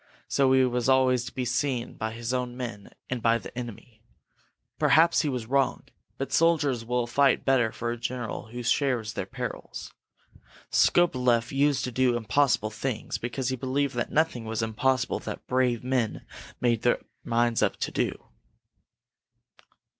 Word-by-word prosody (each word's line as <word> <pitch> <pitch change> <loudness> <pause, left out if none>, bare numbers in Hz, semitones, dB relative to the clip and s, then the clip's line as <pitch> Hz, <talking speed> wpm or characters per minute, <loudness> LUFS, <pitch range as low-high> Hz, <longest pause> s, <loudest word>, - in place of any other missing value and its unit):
So 135 -1 +3
he 130 -1 +5
was 125 0 0
always 130 -2 +3
to 120 - -7
be 130 - -3
seen 125 0 -1
by 110 0 -4
his 115 +1 -4
own 125 -1 -2
men 115 -5 -6 0.2
and 125 -2 -3
by 115 +1 +3
the - - -10
enemy. 115 -2 -8 0.8
Perhaps 165 +2 +5
he 150 - -1
was 125 -4 -3
wrong, 135 +2 +1 0.3
but 135 0 -4
soldiers 145 -6 +2
will 120 +1 0
fight 140 +4 +2
better 125 -4 +3
for 120 +1 -3
a 120 - -4
general 120 -1 -4
who 120 +2 -7
shares 120 -3 +1
their - - -4
perils. - - -6 0.8
Skobeleff 125 -9 +3
used 140 0 +2
to 125 - -3
do 125 0 +2
impossible 110 -1 +1
things, 115 +1 -3
because 125 +2 -3
he 130 - -1
believed 135 +2 -1
that 120 -1 -2
nothing 155 -7 +1
was 110 0 -2
impossible 125 +3 0
that - - -7
brave 125 -2 +1
men 125 -4 -1 0.3
made 120 -2 +2
up - - -28
their 120 - +1 0.2
minds 120 0 +1
to 105 - 0
do." - - -2
125 Hz, 160 wpm, -27 LUFS, 115-130 Hz, 0.8 s, he